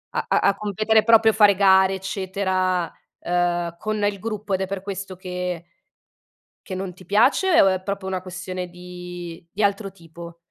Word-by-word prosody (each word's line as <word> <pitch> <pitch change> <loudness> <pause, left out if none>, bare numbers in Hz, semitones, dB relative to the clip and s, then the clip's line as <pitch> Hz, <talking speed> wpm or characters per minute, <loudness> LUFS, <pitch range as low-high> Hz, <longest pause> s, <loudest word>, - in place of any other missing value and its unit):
A - - 0
a - - +3
a - - +2
competere, 215 +1 +1
proprio 225 -1 +5
fare 205 -2 +5
gare, 190 -1 +5
eccetera, 190 -2 -1 0.3
uhm, 175 -1 0
con 215 -1 -2
il 205 -1 0
gruppo 215 -1 -4
ed 190 - 0
è 190 - -1
per 195 -1 -5
questo 195 -1 -6
che 180 -2 -5 1.0
che 190 - -5
non 185 -1 -5
ti 185 0 -16
piace 275 - +4
o 195 - +5
è 185 -1 +1
proprio 200 0 -4
una 185 -1 -2
questione 185 0 -6
di 175 -1 -9
di 210 - -4
altro 200 -1 0
tipo? 170 -1 -12
190 Hz, 170 wpm, -23 LUFS, 180-200 Hz, 1.0 s, proprio